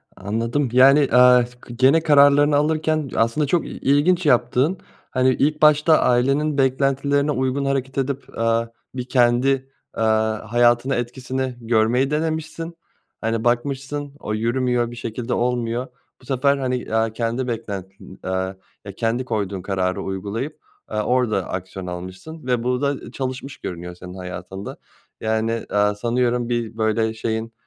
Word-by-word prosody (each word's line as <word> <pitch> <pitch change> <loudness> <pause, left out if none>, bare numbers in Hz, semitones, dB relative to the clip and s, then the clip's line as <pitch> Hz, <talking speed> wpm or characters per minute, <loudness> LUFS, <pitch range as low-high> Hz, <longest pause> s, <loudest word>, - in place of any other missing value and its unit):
Anladım, 115 +7 -1
yani, 135 +3 +7
eee, 125 -3 +6
s 125 0 -13
gene 135 +6 +4
kararlarını 145 -1 +5
alırken 155 -1 +1
aslında 115 +6 +1
çok 170 +3 +1
i - - -7
ilginç 160 +6 +2
yaptığın, 130 +5 +2 0.3
hani, 130 0 +3
ilk 150 +4 0
başta 150 +1 +5
ailenin 140 +4 +2
beklentilerine 140 +2 +1
uygun 130 +1 -1
hareket 135 -1 -2
edip, 135 0 -2
aaa, 115 0 +1 0.3
bir 125 - -3
kendi, 130 +2 +2 0.2
aaa, 110 0 0
hayatına 120 +2 +3
etkisini 130 +1 -3
görmeyi 120 +4 +2
denemişsin. 160 +2 -3 0.5
Hani, 115 0 -1
bakmışsın, 140 +4 -1
o 105 - -4
yürümüyor, 120 +1 0
bir 120 - -8
şekilde 115 +1 -4
olmuyor. 120 +1 -1 0.3
Bu - - -18
sefer, 140 +2 +2
hani, 125 -4 -3
aaa, 110 0 +2
kendi 120 +3 -2
beklentin, 100 -4 -6
aaa, 95 0 -2 0.3
ya, 100 - -6
kendi 120 +2 -1
koyduğun 100 -5 -2
kararı 95 -1 -1
uygulayıp, 100 +9 -4 0.3
aaa, 105 - -2
orada 115 -7 +1
aksiyon 95 0 -5
almışsın 95 - -8
ve 125 -2 +1
bu 125 +2 0
da 140 -1 -2
çalışmış 130 +1 -5
görünüyor 90 0 -6
senin 90 0 -10
hayatında. 95 +1 -7 0.4
Yani, 110 +1 -1
aaa, 105 0 +2
sanıyorum 120 +1 0
bir 115 -2 -2
böyle 110 0 +1
şeyin, 110 0 -3
125 Hz, 140 wpm, -22 LUFS, 110-135 Hz, 0.5 s, yani